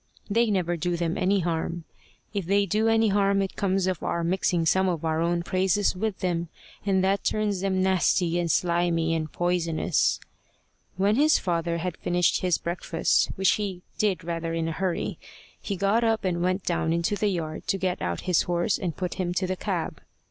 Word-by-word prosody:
They 230 +2 +3
never 175 -4 0
do 175 +1 -1
them 170 -1 -1
any 195 +1 +2
harm. 170 0 -2 0.5
If 200 -5 -3
they 200 +1 +3
do 215 +4 +1
any 225 -1 +3
harm, 200 0 +2
it 195 - -5
comes 190 -1 0
of 185 -3 -1
our 170 - -1
mixing 175 -1 +1
some 190 +3 +3
of 165 -2 -2
our 160 0 0
own 170 0 0
praises 190 +2 +1
with 210 +1 -3
them, 170 -2 -1 0.3
and 190 -2 +2
that 195 +1 +1
turns 210 -3 0
them 190 -1 +1
nasty 180 -2 +2
and 170 -1 -1
slimy 170 0 +1
and 155 -1 -2
poisonous. 175 -2 +1 0.8
When 200 +4 +2
his 305 +2 +5
father 170 -2 -1
had 175 0 -4
finished 175 -1 +1
his 180 -2 +2
breakfast, 170 +1 0
which 190 0 +3
he 190 -3 -4 0.2
did 195 -4 +1
rather 165 -1 -3
in 165 -1 -1
a - - -2
hurry, 180 +1 -2 0.4
he 200 - -3
got 200 +5 +2
up 225 -2 +1
and 175 -2 0
went 185 +1 0
down 165 -2 0
into 170 +4 0
the 210 - 0
yard 160 -4 -4
to 195 - +1
get 185 -1 -2
out 85 -1 -2
his 180 -3 +2
horse 175 +3 0
and 175 -5 -3
put 180 -1 -2
him 175 -1 -2
to 185 - +1
the 185 0 -2
cab. - - -3
180 Hz, 195 wpm, -26 LUFS, 170-195 Hz, 0.8 s, his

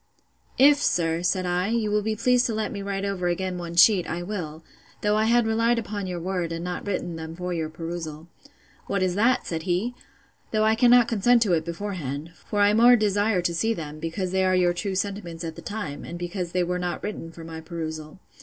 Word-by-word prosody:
If, 285 +2 +7
sir, 165 -1 +1
said 180 +1 0
I, 180 +1 0
you 220 -1 0
will 210 0 +2
be 215 +1 -1
pleased 250 +3 +3
to 225 - -2
let 215 0 -2
me 200 - -5
write 200 0 -3
over 190 -3 -1
again 180 +1 -2
one 170 -1 -6
sheet, 180 +1 +5
I 170 +2 -3
will; 165 -5 -5 0.4
though 210 0 +2
I 215 +1 +2
had 235 +1 +4
relied 230 +2 +2
upon 205 -3 -3
your 180 -1 -4
word, 180 -1 -2
and 165 +1 -4
not 180 +2 -4
written 175 -4 -2
them 160 0 -7
for 180 +1 -4
your 160 -2 -2
perusal. 165 -1 -6 0.6
What 200 -2 0
is 185 -1 +1
that? 235 +7 +2
said 165 -2 -3
he: 195 +8 0 0.6
though 215 -1 +1
I 220 0 +4
cannot 240 +1 +5
consent 235 +2 +4
to 195 -5 +1
it 160 -2 +2
beforehand: 170 -5 -5 0.2
for 205 - 0
I 205 0 +5
more 240 +3 +7
desire 205 -3 +1
to 170 - 0
see 225 +7 0
them, 155 -2 -7
because 175 +3 -3
they 190 0 +2
are 185 0 +3
your 180 -1 +3
true 190 +2 -3
sentiments 185 -4 -3
at 165 -1 -5
the - - -9
time, 155 -9 -5
and 170 - -7
because 175 0 -4
they 180 0 +1
were 180 +1 -1
not 180 -1 -3
written 205 -5 -5
for 165 0 -11
my 160 0 -7
perusal. 160 0 -6
185 Hz, 225 wpm, -25 LUFS, 170-210 Hz, 0.6 s, If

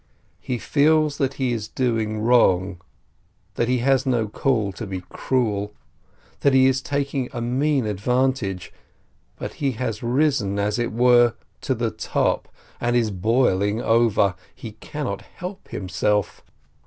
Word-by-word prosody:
He 125 - -3
feels 150 +3 +2
that 135 0 0
he 130 -3 0
is 110 -2 -4
doing 110 -3 -1
wrong, 95 -6 +3 0.7
that 120 - 0
he 125 +1 +2
has 135 -1 +3
no 120 -5 0
call 110 -2 0
to 100 +3 -7
be 95 -1 -5
cruel, 105 -5 -1 0.6
that 140 -2 +3
he 130 0 +6
is 130 0 +2
taking 140 -2 -2
a 120 - -4
mean 130 +2 0
advantage, 110 -2 -1 0.6
but - - -6
he 135 -2 +1
has 115 -3 -3
risen, 120 -5 +1
as 105 +3 0
it 120 - -1
were, 120 0 +4 0.3
to - - -1
the - - -1
top, - - -1 0.3
and 120 0 0
is 115 -3 +2
boiling 105 0 +1
over. 115 -5 +3 0.2
He 115 - -8
cannot 110 0 -5
help 190 +2 -9
himself. 105 +2 -1
120 Hz, 140 wpm, -23 LUFS, 105-130 Hz, 0.7 s, he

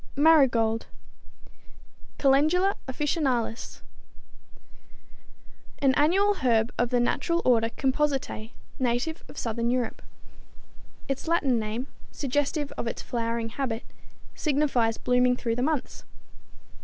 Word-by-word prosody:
=Marigold= 265 -7 +4 1.3
(Calendula 310 +8 +3
officinalis, 260 -4 -2 2.0
Linn.), 275 -2 +4
an - - -1
annual 385 +8 +3
herb 230 -2 +3
of 245 0 0
the 245 0 +2
natural 310 +8 +1
order 230 -2 +3
Compositæ, 265 -4 -1 0.3
native 255 +6 -1
of - - -14
southern 230 0 -1
Europe. 245 -1 -1 1.1
Its 275 +3 -3
Latin 285 -8 +2
name, 220 +4 -3 0.3
suggestive 290 +1 -1
of - - -2
its - - -4
flowering 230 -1 -2
habit, 230 -2 -3 0.5
signifies 270 -7 +1
blooming 250 0 +2
through 230 -2 -2
the 245 - -2
months. 295 0 -2
255 Hz, 105 wpm, -26 LUFS, 235-295 Hz, 2.0 s, =Marigold=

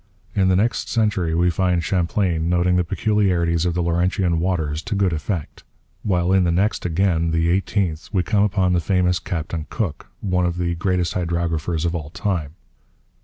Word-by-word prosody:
In 95 -2 +2
the 95 - +3
next 110 +6 0
century 100 -7 +1
we 90 +1 +3
find 90 -1 +1
Champlain 85 -2 0
noting 90 +1 +2
the 90 - +3
peculiarities 90 -3 +1
of 85 - -1
the 90 - 0
Laurentian 85 0 +1
waters 80 -4 -1
to 100 +4 -4
good 95 -3 +1
effect; 80 0 -4 0.4
while 90 -2 +1
in 95 -1 +4
the 85 - +2
next 95 +2 0
again, 85 -1 +1
the 80 +1 +1
eighteenth, 90 -3 -1
we 95 -4 +1
come 105 0 +1
upon 95 -3 +2
the 90 - +3
famous 90 0 +1
Captain 85 -4 -4
Cook, 95 -10 -3
one 90 -3 0
of 85 0 -3
the 85 -1 0
greatest 90 0 0
hydrographers 85 -2 -1
of 85 - 0
all 75 -4 -4
time. 85 -4 -3
90 Hz, 175 wpm, -21 LUFS, 85-95 Hz, 0.4 s, in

